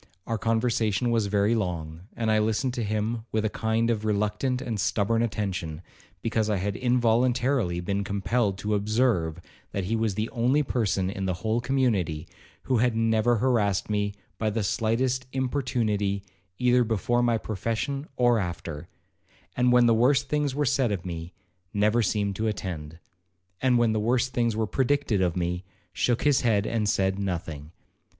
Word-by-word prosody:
Our 115 -1 -2
conversation 115 0 +1
was 115 -3 +1
very 100 +2 +2
long, 85 -5 -3
and 115 -1 0
I 110 - +4
listened 110 +4 0
to 120 - -2
him 110 +2 -1
with 110 0 0
a 110 - 0
kind 115 +1 0
of 110 -2 -2
reluctant 105 +5 0
and 120 -5 -4
stubborn 110 +3 +1
attention, 95 -7 -3 0.4
because 110 -1 0
I 105 - +2
had 100 +2 -2
involuntarily 120 -4 +2
been 100 +3 -1
compelled 100 +1 0
to 105 +1 -2
observe, 105 -6 +1 0.3
that 100 - -1
he 105 +5 -1
was 110 -3 0
the 110 +2 -1
only 125 +6 +2
person 100 -7 0
in 95 -1 -3
the 90 - 0
whole 110 +2 +1
community 115 - 0 0.4
who 130 - +1
had 120 0 +2
never 115 +1 +2
harassed 105 -5 +1
me 100 -1 0 0.2
by 110 - +1
the 110 0 -1
slightest 125 +5 0
importunity 115 -7 -1 0.3
either 125 0 +4
before 120 +2 0
my 120 -1 +2
profession 115 - -3
or 120 -2 +3
after; 85 -5 -5 0.7
and 125 0 +3
when 125 0 +6
the 115 - +5
worst 135 +4 +3
things 150 -3 0
were 145 0 +1
said 130 -3 +2
of 95 -3 -3
me, 85 -1 -5 0.4
never 105 +3 +3
seemed 100 -2 0
to 110 - 0
attend; 80 -7 -4 0.6
and 130 -2 +3
when 120 -2 +3
the 110 - 0
worst 120 +3 +1
things 115 -2 +1
were 110 0 0
predicted 130 -3 +1
of 90 -1 +1
me, 90 +1 -2 0.3
shook 120 +5 +1
his 145 -3 +4
head 110 -4 +2
and 110 -2 0
said 95 -1 +1
nothing. 80 -6 -4
110 Hz, 170 wpm, -26 LUFS, 100-120 Hz, 0.7 s, when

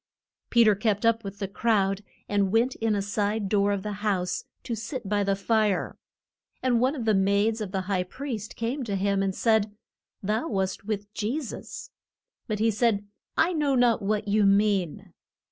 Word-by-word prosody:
Pe 235 -1 +5
ter 215 -2 +6
kept 210 +1 0
up 230 0 +3
with 200 0 -7
the 195 -1 -3
crowd 195 -1 +1 0.3
and 200 -2 +1
went 235 +4 +3
in 225 -2 +1
a 200 - -1
side 205 +1 -1
door 200 0 +2
of 200 -2 -2
the 210 - -3
house 185 -4 -1 0.2
to 240 - -4
sit 230 +1 -5
by 205 0 +1
the 195 0 +1
fire. 210 0 +1 0.7
And 245 -2 +3
one 260 +4 +2
of 245 -6 -4
the 220 - +3
maids 200 +3 +2
of 200 -3 -4
the 190 -1 -1
high 185 0 0
priest 225 0 -6
came 245 +5 -2
to 205 -3 -2
him, 195 0 +1
and 195 -1 -1
said, 220 -2 +2 0.5
Thou 215 +9 0
wast 190 - -2
with 205 -1 -4
Je 230 +8 -1
sus. 275 - -8 0.6
But 215 -3 -1
he 225 +2 +2
said, 215 -2 +1 0.3
I 340 +3 +3
know 295 -4 +1
not 245 -3 +3
what 210 +1 -1
you 210 +1 +3
mean. 195 -4 +1
210 Hz, 190 wpm, -26 LUFS, 200-230 Hz, 0.7 s, ter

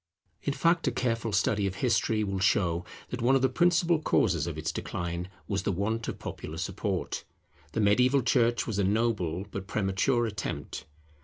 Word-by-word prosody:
In 140 - -1
fact 170 +3 +2
a - - +3
careful 115 -2 -1
study 100 0 +2
of 95 - -4
history 110 -1 +1
will 100 -2 -2
show 90 -4 +2 0.3
that 125 - -4
one 125 +3 +4
of 135 - +2
the 130 - +4
principal 170 +2 +3
causes 85 - +2
of 80 -3 -4
its 80 +1 -2
decline 85 +1 -4 0.2
was 100 -2 -1
the 100 - 0
want 110 +5 -1
of - - -4
popular 80 - -7
support. 95 +1 -2 0.5
The - - 0
mediaeval 125 +6 +4
church 120 -1 +2
was 105 -3 -2
a - - +3
noble, 100 -4 0
but 95 -1 -5
premature 105 +5 +1
attempt. 110 -2 -5
105 Hz, 175 wpm, -29 LUFS, 95-120 Hz, 0.5 s, one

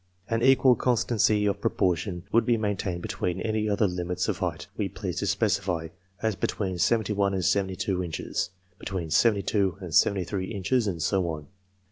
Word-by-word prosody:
An 115 0 +1
equal 130 0 +6
constancy 110 -3 +2
of 100 0 0
proportion 90 -2 0
would 115 - +4
be 120 -2 +2
main 105 -2 0
tained 90 -3 -3
between 90 +1 -2
any 110 0 0
other 105 +1 +2
limits 90 -1 -2
of - - -1
height - - -3
we - - -2
pleased - - -4
to - - -1
specify, 80 -2 0 0.3
as 110 -2 +1
between 95 -1 -2
seventy 110 +1 +2
one 100 -1 +1
and 90 -2 -1
seventy 95 -2 +1
two 90 -1 -1
inches; 85 +1 -3 0.3
be - - -7
tween 90 -4 -4
seventy 105 +1 +4
two 95 -2 +1
and 90 -5 -7
seventy 95 +3 +4
three 95 +1 -3
inches; 110 +4 0
and 85 -5 -2
so 95 -4 +1
on. 75 -3 -6
100 Hz, 190 wpm, -27 LUFS, 90-110 Hz, 0.3 s, equal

